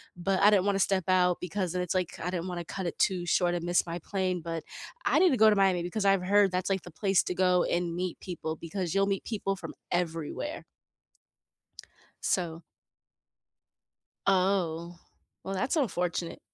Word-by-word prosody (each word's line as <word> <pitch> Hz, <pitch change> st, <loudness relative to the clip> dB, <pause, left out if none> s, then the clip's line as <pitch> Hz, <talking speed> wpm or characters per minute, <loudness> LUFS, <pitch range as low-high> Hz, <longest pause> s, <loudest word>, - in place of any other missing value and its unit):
but 185 Hz, +2 st, 0 dB
I 205 Hz, +1 st, +7 dB
didn't 195 Hz, -2 st, +3 dB
want 200 Hz, -1 st, +2 dB
to -, -, 0 dB
step 195 Hz, -1 st, +3 dB
out 180 Hz, -1 st, +3 dB
because 180 Hz, 0 st, -2 dB
then 180 Hz, +1 st, -1 dB
it's, 180 Hz, 0 st, -2 dB
like, 180 Hz, -2 st, -2 dB
I 180 Hz, -, -3 dB
didn't 180 Hz, -1 st, -3 dB
want 180 Hz, -1 st, -4 dB
to 170 Hz, -, -6 dB
cut 190 Hz, -1 st, -3 dB
it 170 Hz, -, -4 dB
too 180 Hz, -2 st, +1 dB
short 175 Hz, 0 st, +2 dB
and 175 Hz, -, -3 dB
miss 175 Hz, 0 st, +2 dB
my 170 Hz, 0 st, -4 dB
plane, 185 Hz, 0 st, -2 dB
but 165 Hz, -1 st, -4 dB, 0.4 s
I -, -, +3 dB
need 370 Hz, -, +6 dB
to 260 Hz, -, +2 dB
go 220 Hz, -, +9 dB
to 210 Hz, -, +3 dB
Miami 190 Hz, -3 st, +3 dB
because 200 Hz, +4 st, -2 dB
I've 195 Hz, -1 st, +4 dB
heard 205 Hz, -2 st, +5 dB
that's, 180 Hz, +1 st, -1 dB
like, 195 Hz, -1 st, 0 dB
the 175 Hz, -, -11 dB
place 195 Hz, -3 st, +3 dB
to -, -, -3 dB
go 180 Hz, -1 st, +3 dB
and 175 Hz, -1 st, -1 dB
meet 180 Hz, -1 st, -3 dB
people 165 Hz, -4 st, -5 dB
because 170 Hz, +1 st, -4 dB
you'll 195 Hz, 0 st, +3 dB
meet 195 Hz, -, -5 dB
people 195 Hz, -2 st, -1 dB
from 195 Hz, -, -8 dB, 0.2 s
everywhere. 175 Hz, -, -3 dB, 1.6 s
So 170 Hz, -2 st, -1 dB, 1.6 s
Oh, 180 Hz, -3 st, +1 dB, 0.5 s
well, 195 Hz, -, -4 dB
that's 250 Hz, -, 0 dB
unfortunate. 180 Hz, -, -1 dB
180 Hz, 190 wpm, -29 LUFS, 175-195 Hz, 1.6 s, go